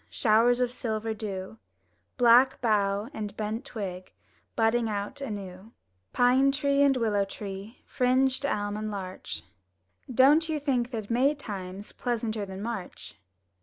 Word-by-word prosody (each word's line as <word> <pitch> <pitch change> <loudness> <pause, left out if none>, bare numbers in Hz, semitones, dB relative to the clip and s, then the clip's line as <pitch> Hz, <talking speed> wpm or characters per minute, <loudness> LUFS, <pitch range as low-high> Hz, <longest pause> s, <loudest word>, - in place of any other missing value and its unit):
Showers 235 +1 +3
of 250 -1 +1
silver 220 -2 -3
dew, 205 0 -6 0.6
Black 245 +1 +6
bough 205 -2 +1
and 210 -1 -6
bent 215 +2 -3
twig 185 -5 -6 0.4
Budding 225 0 +2
out 205 +7 -4
anew; 200 -3 -7 0.4
Pine 255 +3 +4
tree 280 0 +1
and 275 -2 +4
willow 215 -4 +1
tree, 195 +2 -8
Fringed 260 +1 +1
elm 205 -6 -1
and 215 0 -3
larch, 185 - -6 0.3
— 90 - -17
Don't 290 +6 +5
you 310 -1 0
think 255 -4 0
that 225 -3 -5
May 265 +5 +3
time's 200 -6 -7
Pleasanter 225 -4 -2
than 190 +1 -7
March? 190 - -6
225 Hz, 135 wpm, -28 LUFS, 200-250 Hz, 0.6 s, Black